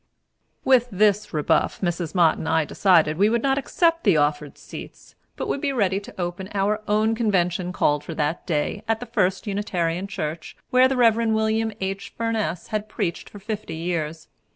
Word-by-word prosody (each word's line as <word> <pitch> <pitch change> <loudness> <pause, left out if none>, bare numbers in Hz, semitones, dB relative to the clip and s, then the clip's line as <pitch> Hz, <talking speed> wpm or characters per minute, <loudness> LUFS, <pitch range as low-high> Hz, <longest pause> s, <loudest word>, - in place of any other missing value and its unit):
With 255 -2 +5
this 210 +1 +2
rebuff, 150 -3 +1
Mrs. 175 -2 -2
Mott 170 -3 +4
and 160 - -3
I 160 -1 +2
decided 160 -3 +3
that - - -9
we 205 +2 +5
would 235 0 0
not 270 0 +2
accept 335 +4 +1
the 195 -7 +4
offered 145 -1 0
seats, - - -11 0.2
but - - -4
would 280 - -2
be 285 - 0
ready 200 -7 +1
to 200 - -13
open 175 +2 -4
our 205 +2 +1
own 215 +2 +2
convention 180 -5 0
called 150 -4 +1
for 165 - -7
that 150 +2 -2
day, 160 +4 -1
at 225 0 +1
the 245 - -6
First 195 -5 0
Unitarian 190 -3 -2
church, 160 -5 -5
where 255 +1 +6
the 265 0 -1
Rev. 230 -1 +4
William 220 0 +1
H. 195 +1 -4
Furness 225 -6 -2
had 215 0 -3
preached 170 -4 -3
for - - -11
fifty 205 -4 -5
years. 160 -2 -3
195 Hz, 185 wpm, -23 LUFS, 170-220 Hz, 0.2 s, where